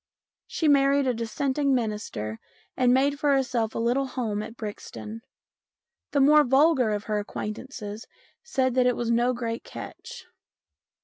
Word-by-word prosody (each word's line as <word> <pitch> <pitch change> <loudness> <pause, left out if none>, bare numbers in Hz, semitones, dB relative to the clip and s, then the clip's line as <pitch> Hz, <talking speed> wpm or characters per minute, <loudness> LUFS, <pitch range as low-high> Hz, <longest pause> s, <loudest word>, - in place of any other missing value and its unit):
She 320 - -1
married 280 -1 +4
a 255 - +2
Dissenting 265 +5 0
minister 210 - -3 0.4
and 250 -1 +3
made 280 +3 +2
for 290 -2 +3
herself 240 -4 0
a - - -2
little 245 +4 +1
home 225 -5 -2
at 225 +2 -8
Brixton. 215 +1 -7 0.9
The 285 - +1
more 300 +2 +6
vulgar 270 -1 +4
of 210 -1 -2
her 210 -1 -1
acquaintances 215 +1 -6 0.3
said 260 -9 0
that 250 0 +3
it 250 - +2
was 235 -1 -1
no 240 +2 +3
great 230 -1 -4
catch. - - -9
250 Hz, 145 wpm, -26 LUFS, 220-275 Hz, 0.9 s, more